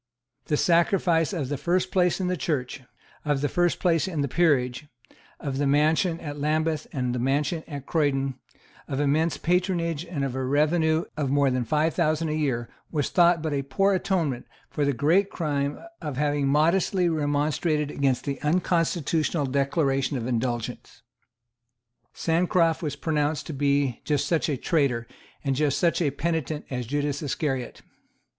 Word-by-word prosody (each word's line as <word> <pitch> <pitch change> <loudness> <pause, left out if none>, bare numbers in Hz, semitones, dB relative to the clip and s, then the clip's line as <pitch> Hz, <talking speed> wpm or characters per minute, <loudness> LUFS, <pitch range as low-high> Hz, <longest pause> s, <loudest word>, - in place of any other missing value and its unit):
The 150 - 0
sacrifice 170 0 +2
of 155 -9 -3
the 145 -2 -3
first 180 +4 0
place 180 -1 +2
in 185 - -1
the 180 0 0
Church, 140 -5 -2 0.4
of 145 -2 0
the 145 - +1
first 175 +4 +1
place 170 -1 +2
in 165 -6 -2
the 140 - 0
peerage, 140 -3 +1 0.5
of 135 -2 -3
the 145 - +1
mansion 155 +4 +2
at 145 -2 -6
Lambeth 155 +1 0
and 125 -3 -2
the 125 - -2
mansion 145 +6 0
at 140 -4 -7
Croydon, 140 -4 0 0.5
of 135 - -3
immense 150 +3 +1
patronage 175 -3 0
and 165 -5 -3
of 135 - -3
a 130 0 -2
revenue 155 +4 +2
of 145 -3 -1
more 140 -1 +3
than 125 -1 0
five 155 +6 +1
thousand 155 +1 +1
a - - -1
year 130 -6 -1 0.2
was 150 -4 -1
thought 175 -2 +4
but 155 -2 -1
a 140 - 0
poor 195 +9 +1
atonement 170 - -1 0.2
for 145 - 0
the 140 - +2
great 170 +10 +2
crime 145 -3 -2 0.2
of 145 -4 -5
having 145 -1 +1
modestly 170 +5 +2
remonstrated 150 0 0
against 135 -3 0
the 140 -2 -3
unconstitutional 165 -1 +1
Declaration 135 0 0
of 115 - -4
Indulgence. 120 -1 -3 1.1
Sancroft 165 0 +1
was 150 -4 -3
pronounced 150 -1 -1
to 160 - -6
be 140 -2 +1
just 145 -2 0
such 165 -1 +1
a 145 - 0
traitor 130 -5 0 0.4
and 135 -2 0
just 145 0 +1
such 170 0 +2
a 155 - +2
penitent 155 0 -2
as 125 -3 -3
Judas 145 +1 -1
Iscariot. 135 -4 -3
150 Hz, 165 wpm, -26 LUFS, 140-165 Hz, 1.1 s, thought